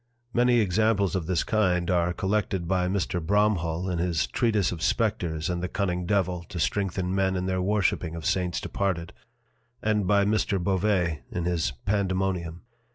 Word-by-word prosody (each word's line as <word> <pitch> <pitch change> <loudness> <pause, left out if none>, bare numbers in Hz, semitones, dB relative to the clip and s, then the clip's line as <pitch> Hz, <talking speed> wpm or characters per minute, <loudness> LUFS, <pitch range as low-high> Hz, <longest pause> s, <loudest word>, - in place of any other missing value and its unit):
Many 120 0 +4
Examples 100 0 +2
of 85 -4 -2
this 90 -3 +1
kind 90 -5 +1
are 90 -1 +2
collected 95 -2 -1
by 90 0 +1
Mr. 90 -2 -1
Bromhall 95 -3 +1
in 90 -2 -1
his 85 -2 +1
Treatise 110 -5 +1
of 85 -3 -6
Spectres, 85 -8 0
and 90 -1 -2
the 90 - -2
cunning 90 -2 -2
Devil, 90 -3 0
to 90 - -5
strengthen 95 0 -1
Men 95 -1 +1
in 90 0 -1
their 95 0 0
worshipping 95 -4 0
of 85 - -7
Saints 90 -2 0
departed: 90 -4 -2 0.7
And 105 -3 0
by 100 0 +4
Mr. 105 -1 +1
Bovet 90 -3 0
in 85 -1 -3
his 85 -5 0
Pandemonium. 95 -4 -1
95 Hz, 160 wpm, -26 LUFS, 85-100 Hz, 0.7 s, Many